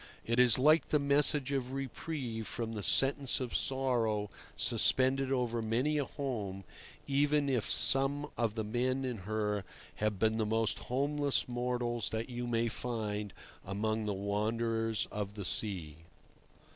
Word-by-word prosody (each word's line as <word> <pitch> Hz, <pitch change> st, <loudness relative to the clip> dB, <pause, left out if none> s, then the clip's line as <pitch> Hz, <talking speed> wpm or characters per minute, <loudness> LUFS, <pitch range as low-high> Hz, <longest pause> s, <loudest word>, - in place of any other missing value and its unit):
It 115 Hz, +2 st, 0 dB
is 125 Hz, -3 st, +6 dB
like 155 Hz, +5 st, +4 dB
the 150 Hz, -, +3 dB
message 140 Hz, -1 st, +2 dB
of 130 Hz, -2 st, -2 dB
reprieve 135 Hz, -4 st, -4 dB
from 115 Hz, -1 st, -4 dB
the 105 Hz, -, -4 dB
sentence 135 Hz, +4 st, +3 dB
of 125 Hz, -3 st, -4 dB
sorrow 120 Hz, -6 st, 0 dB, 0.3 s
suspended 130 Hz, +1 st, +3 dB
over 120 Hz, -3 st, 0 dB
many 125 Hz, +7 st, 0 dB
a 140 Hz, -, 0 dB
home, 105 Hz, -10 st, -4 dB, 0.4 s
even 145 Hz, +1 st, +2 dB
if 125 Hz, -5 st, 0 dB
some 135 Hz, +5 st, +3 dB
of 115 Hz, -3 st, -1 dB
the 110 Hz, -, -2 dB
men 130 Hz, +4 st, -1 dB
in 125 Hz, -3 st, -3 dB
her 105 Hz, -2 st, -1 dB, 0.3 s
have 105 Hz, -1 st, 0 dB
been 110 Hz, +2 st, +2 dB
the 110 Hz, -, +1 dB
most 110 Hz, 0 st, 0 dB
homeless 140 Hz, +2 st, +1 dB
mortals 120 Hz, -1 st, -2 dB
that 110 Hz, +2 st, -3 dB
you 120 Hz, 0 st, -4 dB
may 115 Hz, 0 st, +1 dB
find 105 Hz, -3 st, -3 dB, 0.3 s
among 110 Hz, +2 st, -2 dB
the 105 Hz, -, 0 dB
wanderers 110 Hz, +2 st, -1 dB
of 105 Hz, -1 st, -4 dB
the 100 Hz, -3 st, -5 dB
sea. 90 Hz, -7 st, -1 dB
120 Hz, 145 wpm, -32 LUFS, 110-135 Hz, 0.4 s, is